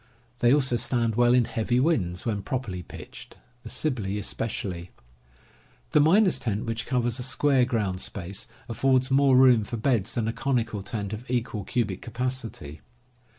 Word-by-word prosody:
They 120 0 +4
also 130 -4 +3
stand 115 -1 0
well 120 +2 +4
in 125 -2 +4
heavy 120 +1 0
winds, 100 - 0
when 105 -4 -1
properly 115 -8 -4
pitched, - - -11 0.2
the 115 - -9
Sibley 115 -6 -2
especially. 95 -4 -4 1.0
The - - +5
miner's 185 +6 +4
tent, 110 -1 -2
which 115 0 -4
covers 120 -1 0
a - - -3
square 130 0 +2
ground 105 -7 -1
space, 95 0 -4 0.2
affords 130 +3 +1
more 135 -1 +5
room 125 -4 +6
for 115 +3 -5
beds 115 -4 0
than 115 -2 0
a 115 - -1
conical 120 -6 -1
tent 100 0 -4
of 115 +4 -8
equal 120 -4 -2
cubic 105 -6 -1
capacity. 120 - -4
120 Hz, 155 wpm, -26 LUFS, 105-130 Hz, 1.0 s, room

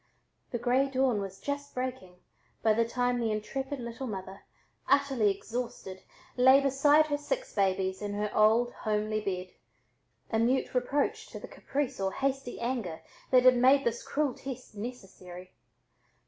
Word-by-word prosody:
The 240 - -2
gray 250 +3 +2
dawn 260 -5 +1
was 195 -1 -7
just 285 0 -5
breaking 255 -8 -4 0.5
by 220 - +5
the 230 +1 +1
time 245 0 0
the 230 -2 0
intrepid 265 +6 -3
little 235 +2 -6
mother, 195 -2 -7 0.5
utterly 275 -6 +3
exhausted, 200 -2 -5 0.3
lay 260 +2 +7
beside 280 +3 +4
her 290 -1 -2
six - - -3
babies 190 -1 0
in 205 -1 -3
her 210 0 -2
old 225 +3 +4
homey 215 0 -1
bed, 185 -2 -4 0.8
a 220 - +1
mute 255 +3 +1
reproach 260 +3 0
to - - -9
the - - -9
caprice 275 -3 -3
or 190 0 0
hasty 270 -2 -2
anger 235 -9 -3 0.3
that 255 -1 +5
had 255 -1 +7
made 265 +3 +5
this 235 0 -1
cruel 290 -3 -1
test 260 -2 -8
necessary. 195 -5 -9
245 Hz, 150 wpm, -30 LUFS, 210-270 Hz, 0.8 s, lay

